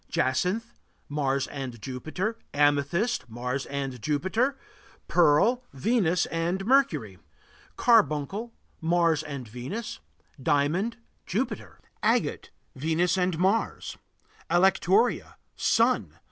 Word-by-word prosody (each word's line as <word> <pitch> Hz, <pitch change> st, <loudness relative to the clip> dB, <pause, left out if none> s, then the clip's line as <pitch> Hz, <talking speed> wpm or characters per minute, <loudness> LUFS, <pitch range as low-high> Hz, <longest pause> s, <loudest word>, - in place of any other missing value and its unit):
Jacinth 180 Hz, -, 0 dB, 0.3 s
Mars 140 Hz, -2 st, 0 dB
and 130 Hz, -4 st, -6 dB
Jupiter. 155 Hz, -, -4 dB, 0.2 s
Amethyst 145 Hz, -, +1 dB
Mars 125 Hz, +4 st, -3 dB
and 135 Hz, -3 st, -4 dB
Jupiter. 190 Hz, -, 0 dB, 0.5 s
Pearl 180 Hz, +10 st, +4 dB
Venus 180 Hz, -, +1 dB
and 175 Hz, +4 st, -2 dB
Mercury. 155 Hz, -, +2 dB, 0.6 s
Carbuncle 210 Hz, -, +2 dB, 0.3 s
Mars 165 Hz, -2 st, +2 dB
and 140 Hz, -5 st, -7 dB
Venus. 130 Hz, -, -6 dB, 0.4 s
Diamond 155 Hz, -, +1 dB, 0.3 s
Jupiter. 230 Hz, +9 st, -3 dB, 0.2 s
Agate -, -, +1 dB, 0.3 s
Venus 165 Hz, +6 st, +1 dB
and 180 Hz, -2 st, 0 dB
Mars. 195 Hz, +6 st, 0 dB, 0.5 s
Alectoria 190 Hz, +5 st, +3 dB, 0.2 s
Sun. -, -, +2 dB
165 Hz, 90 wpm, -27 LUFS, 140-200 Hz, 0.6 s, Pearl